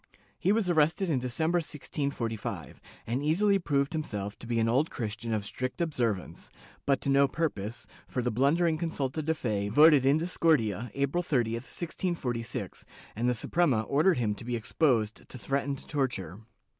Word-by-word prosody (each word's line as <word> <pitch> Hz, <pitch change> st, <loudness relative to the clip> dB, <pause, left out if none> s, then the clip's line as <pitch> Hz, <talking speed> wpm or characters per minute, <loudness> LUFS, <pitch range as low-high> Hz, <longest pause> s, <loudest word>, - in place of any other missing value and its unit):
He 185 Hz, -, +2 dB
was 215 Hz, -2 st, +2 dB
arrested 170 Hz, +2 st, +2 dB
in 135 Hz, -, +2 dB
December, 160 Hz, +8 st, 0 dB
1645, 120 Hz, -, -4 dB, 0.2 s
and 120 Hz, +4 st, -1 dB
easily 195 Hz, +6 st, +3 dB
proved 140 Hz, -3 st, 0 dB
himself 105 Hz, -10 st, -3 dB
to 115 Hz, -, -10 dB
be 120 Hz, -1 st, 0 dB
an 115 Hz, -, +2 dB
Old 135 Hz, +7 st, +2 dB
Christian 115 Hz, 0 st, -4 dB
of 105 Hz, -2 st, -1 dB
strict 130 Hz, -, -4 dB
observance, 120 Hz, -, -2 dB, 0.4 s
but 140 Hz, -2 st, +2 dB
to -, -, -2 dB
no 140 Hz, 0 st, +5 dB
purpose, 120 Hz, -8 st, -3 dB, 0.2 s
for 125 Hz, -, -2 dB
the 125 Hz, -, 0 dB
blundering 155 Hz, +7 st, +2 dB
consulta 155 Hz, -3 st, -2 dB
de 160 Hz, +2 st, 0 dB
fe 105 Hz, -7 st, -1 dB
voted 150 Hz, +3 st, +7 dB
in 135 Hz, +3 st, +4 dB
discordia, 140 Hz, -, +1 dB
April 140 Hz, +5 st, +1 dB
30, 125 Hz, -10 st, +1 dB
1646, 125 Hz, -1 st, -3 dB, 0.3 s
and 120 Hz, +3 st, +1 dB
the 125 Hz, -, +1 dB
Suprema 135 Hz, -3 st, +1 dB
ordered 150 Hz, -, +3 dB
him 110 Hz, -4 st, +1 dB
to 105 Hz, -, -8 dB
be 120 Hz, +1 st, -2 dB
exposed 115 Hz, -2 st, 0 dB
to -, -, -8 dB
threatened 140 Hz, +4 st, -2 dB
torture. 105 Hz, -, -2 dB
135 Hz, 160 wpm, -29 LUFS, 115-160 Hz, 0.4 s, voted